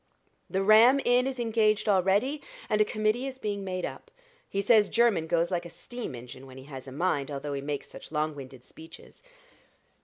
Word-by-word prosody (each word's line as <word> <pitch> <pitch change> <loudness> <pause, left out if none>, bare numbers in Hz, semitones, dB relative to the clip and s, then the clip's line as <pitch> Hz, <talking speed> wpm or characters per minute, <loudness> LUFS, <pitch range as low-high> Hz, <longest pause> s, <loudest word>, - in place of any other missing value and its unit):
The 190 +1 0
Ram 225 +6 +7
Inn 250 +1 +3
is 265 -1 -4
engaged 220 -2 +1
already, 205 +9 +2 0.3
and 210 0 +3
a - - +5
committee 215 +5 0
is 265 -1 -7
being 205 -4 -3
made 185 -1 -3
up. - - -8 0.4
He 200 - -2
says 210 +1 +4
Jermyn 225 -9 +2
goes 170 +2 +1
like 175 -1 -1
a - - -12
steam 240 - -7
engine, 125 +2 -11
when 130 0 -12
he 130 - -10
has 135 -2 -10
a - - -8
mind, 145 -1 -1
although 145 0 -4
he 140 - -3
makes 145 0 -4
such - - -12
long 155 0 -1
winded 130 -3 -11
speeches." 160 - -14
190 Hz, 195 wpm, -28 LUFS, 145-220 Hz, 0.4 s, Ram